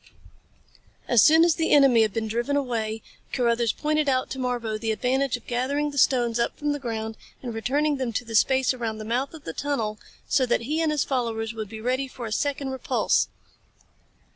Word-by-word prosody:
AS 240 -3 +5
soon 320 +7 +7
as 340 - +4
the 325 0 -1
enemy 270 -5 +6
had 215 -1 +2
been 220 +1 -2
driven 240 +6 -1
away, 225 -5 -2 0.3
Carruthers 235 -2 +1
pointed 305 -1 0
out 255 -1 0
to 265 - -4
Marbo 245 -3 -2
the 225 0 -1
advantage 255 +3 0
of 245 - -19
gathering 280 +5 -1
the 285 - -9
stones 240 -3 +3
up 235 - -1
from 295 0 -1
the 290 - -2
ground 225 -3 -4 0.3
and 240 -2 -4
returning 285 +6 0
them 255 -3 -2
to 245 - -2
the 225 - -8
space 260 +4 +3
around 230 -3 -4
the 215 - -7
mouth 255 +7 -2
of 310 - -12
the 160 - -6
tunnel 225 - -2 0.3
so 270 - +2
that 240 - +1
he 300 +7 -1
and 320 -2 +1
his 300 -2 +1
followers 230 -4 -2
would 220 -2 -6
be 220 0 -8
ready 255 +4 -1
for 250 -2 -8
a 220 - -6
second 280 +3 -1
repulse. 265 - +1
250 Hz, 205 wpm, -25 LUFS, 225-280 Hz, 0.3 s, soon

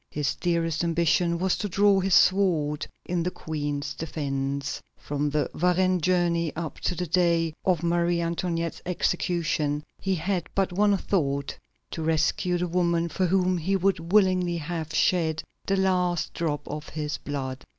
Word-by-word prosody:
His 145 -2 -1
dearest 165 -2 0
ambition 170 +1 +2
was 185 +1 +1
to 205 - -2
draw 200 +1 +4
his 190 -1 +2
sword 165 -7 +3 0.2
in 175 -1 -1
the 175 - 0
Queen's 145 -4 -4
defence. 140 -3 -3 0.2
From 145 0 -2
the 150 0 0
Varennes 180 +1 +2
journey 170 -2 +1
up 165 -1 -5
to 180 - -1
the 180 +1 -2
day 170 -1 +2
of 180 -3 +2
Marie 170 0 +1
Antoinette's 170 0 -2
execution, 170 -4 0 0.2
he 195 -1 0
had 180 +1 -2
but 195 -2 +1
one 205 +1 +3
thought: 140 -8 -1 0.4
to 165 - -4
rescue 160 +3 +1
the 180 +1 -1
woman 170 -1 +1
for 185 +2 0
whom 185 0 +2
he 190 +5 0
would 185 -3 0
willingly 185 -4 +3
have 160 0 -4
shed 160 -3 +1 0.2
the 195 - +2
last 180 -3 +1
drop 155 -3 -2
of 150 +1 -6
his 150 -1 -4
blood. 135 -2 -5
170 Hz, 155 wpm, -26 LUFS, 155-180 Hz, 0.4 s, draw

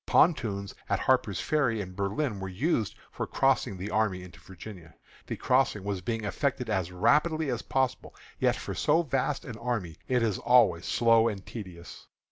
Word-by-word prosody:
Pontoons 105 - +2 0.2
at - - +1
Harper's 125 -6 +2
Ferry 135 -8 +1
and 95 -2 -6
Berlin 100 +4 -1
were 95 0 -5
used 110 - 0 0.2
for - - -4
crossing 135 -7 +1
the 95 +3 -5
army 105 -4 0
into 90 - -13
Virginia. 90 -3 -11 0.3
The - - -3
crossing 125 -6 +2
was 100 -2 -3
being 115 +4 -3
effected 125 +1 -1
as 95 -4 -1
rapidly 150 - +2
as 120 - -2
possible, 130 -1 -1 0.2
yet - - +3
for - - -5
so 165 +3 +2
vast 135 -1 -1
an 115 -3 -7
army 115 -9 -3
it 125 -2 +2
is 110 -5 0
always 105 -9 +4
slow 115 -1 +4
and 100 -4 -4
tedious. 90 -6 -9
110 Hz, 170 wpm, -28 LUFS, 95-130 Hz, 0.3 s, always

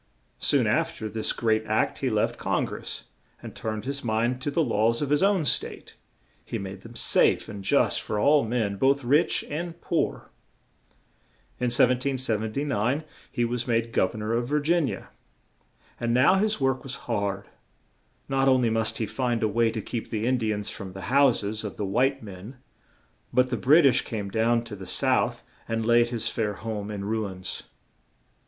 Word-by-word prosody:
Soon - - +3
af - - 0
ter 110 - -4
this 110 0 -1
great 110 -1 +1
act 110 0 0
he 135 - 0
left 110 -2 0
Con - - 0
gress - - -6 0.4
and - - -9
turned 110 -1 -4
his 140 +1 -3
mind 120 +3 0
to 145 - -1
the 160 +3 +1
laws 115 -2 +1
of 145 -1 -2
his 150 - +3
own 195 -4 +3
State; - - -2 0.5
he - - -4
made 95 0 -7
them 115 +2 -12
safe - - +2
and 100 -2 -7
just - - +2
for 105 - -3
all 145 +7 +4
men, 110 -3 -1
both 135 +4 +2
rich 145 +6 +2
and 170 +3 -5
poor. 170 -2 -2 1.3
In 125 - 0
1779 125 +1 +1 0.3
he 120 -3 0
was 120 +1 -2
made 115 -1 0
gov 95 - +1
ern 110 - -5
or 110 +2 -1
of 120 +1 0
Vir 150 +2 +1
gin 165 0 +2
ia; - - -6 0.9
and 120 0 0
now 130 +8 +5
his 210 +1 +1
work 135 -1 +1
was 135 -1 -5
hard; 100 -4 -2 0.8
not 135 0 +1
on 130 -1 +4
ly 115 - +2
must 110 0 0
he 110 - -1
find 120 0 -1
a - - +3
way 115 +2 +2
to 110 -2 -4
keep 115 - -5
the 110 0 -2
In 130 +1 +2
di 110 -2 0
ans 105 0 -2
from 95 -3 -7
the 95 +4 -7
hous 140 -5 +4
es 105 +2 -3
of 105 - -6
the 105 - -2
white 130 +6 +1
men 100 +4 -9 0.8
but 125 0 +2
the - - +1
Brit 140 +8 +5
ish 130 -1 +5
came 105 -4 -5
down 115 +2 +2
to 115 -3 -8
the 95 -2 -9
south - - +1 0.2
and 115 0 -1
laid 120 0 +4
his 120 -1 -2
fair 105 -3 -1
home 105 -2 -5
in 100 -2 -5
ruins. 100 -4 -3
115 Hz, 190 wpm, -26 LUFS, 110-135 Hz, 1.3 s, now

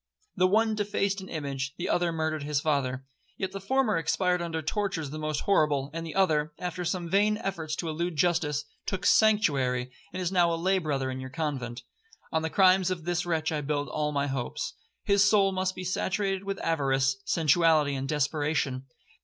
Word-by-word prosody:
The 185 0 +4
one 220 +3 +3
defaced 200 -1 -1
an 190 - -10
image, 140 -2 -4
the 175 - -3
other 175 -1 +1
murdered 160 -1 -2
his 145 0 0
father: 135 -4 -1 0.3
Yet 190 - -3
the 195 - -6
former 250 -1 +1
expired 180 +2 +1
under 165 -2 -3
tortures 165 -5 -2
the 155 - -5
most 155 -1 -2
horrible, 150 -7 +2
and 165 0 -4
the 165 - -7
other, 155 -5 +2
after 180 0 -4
some 175 0 -2
vain 205 +4 +3
efforts 165 -7 -3
to 170 - -4
elude 165 +2 -2
justice, 150 -3 +1 0.2
took 190 -1 -2
sanctuary, 140 - +3 0.2
and - - -5
is 180 -1 -1
now 175 -2 +3
a - - +1
lay 190 +3 +2
brother 140 -5 -1
in 130 - -5
your 130 0 -6
convent. 130 -4 -4 0.5
On 160 - +1
the 160 - -2
crimes 185 0 +4
of 175 -4 -4
this 175 0 -1
wretch 160 -2 0
I 155 -1 -1
build 145 0 -2
all 150 -1 -1
my 140 -1 0
hopes. 135 -3 -3 0.3
His 200 0 +4
soul 200 -1 +4
must 185 0 -1
be 185 - -6
saturated 195 +1 -1
with 195 0 -3
avarice, 135 -4 +1
sensuality, 155 -2 +3
and 135 0 -3
desperation. 145 -3 -1
165 Hz, 190 wpm, -28 LUFS, 145-185 Hz, 0.5 s, The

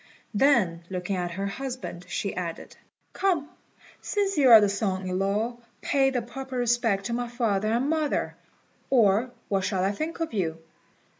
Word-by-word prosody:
Then, 205 -9 +3
looking 185 +1 -3
at 180 -1 -2
her 190 +3 -4
husband, 240 -5 -5
she 200 - -2
added, 170 -2 -5 0.4
"Come, 350 -7 0 0.5
since 400 -2 0
you 275 -4 +5
are 225 -2 +11
the 205 - +3
son 195 -1 -1
in 185 0 -2
law, 210 +5 0 0.2
pay 270 -1 +2
the 250 -3 -1
proper 260 +2 -6
respect 235 -5 +1
to 235 - -2
my 245 0 -1
father 220 -4 0
and 240 +4 +1
mother, 310 -1 0 0.5
or 225 -1 +4 0.2
what 195 -2 0
shall 185 -1 0
I 195 - +2
think 310 +12 -4
of 325 -6 -3
you?" 165 -6 -1
225 Hz, 165 wpm, -26 LUFS, 195-265 Hz, 0.5 s, are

